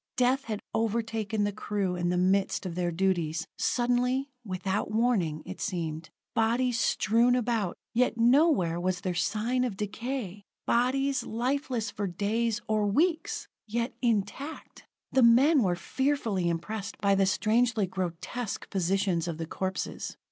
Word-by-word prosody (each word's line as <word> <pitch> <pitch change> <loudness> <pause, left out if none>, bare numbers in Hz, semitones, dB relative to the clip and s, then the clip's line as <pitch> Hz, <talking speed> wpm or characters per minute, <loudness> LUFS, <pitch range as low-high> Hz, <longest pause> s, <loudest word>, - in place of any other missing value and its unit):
Death 255 +2 +2
had 215 -2 -4
overtaken 220 -1 -1
the 205 - +1
crew 200 -2 -2
in 175 0 -1
the 180 - +1
midst 190 +2 +1
of 180 - -3
their 175 0 -1
duties, 170 -2 0
suddenly, 250 +3 +1
without 190 0 -2
warning, 215 -9 +1
it 185 +1 -7
seemed. 165 -4 -3 0.2
Bodies 235 +2 +2
strewn 230 +3 +3
about 230 -6 0 0.2
yet 240 0 +2
nowhere 235 - +4
was 180 0 -1
there 185 -3 -1
sign 215 +9 0
of 230 -6 -2
decay! 210 -1 -4 0.2
Bodies, 265 +2 +2
lifeless 245 -2 -1
for 205 - -3
days, 215 +5 0
or 215 -1 +1
weeks 320 - 0 0.2
yet 235 +3 -1
intact! 235 +6 -2 0.3
The 265 - +4
men 260 +6 +6
were 180 -5 +2
fearfully 225 -3 0
impressed 200 +5 -4
by 200 -1 +2
the 195 -1 +3
strangely 220 +2 +2
grotesque 185 +5 -4
positions 190 -2 +1
of 165 -2 -3
the 165 - -3
corpses. 190 +3 -4
215 Hz, 140 wpm, -28 LUFS, 185-245 Hz, 0.3 s, men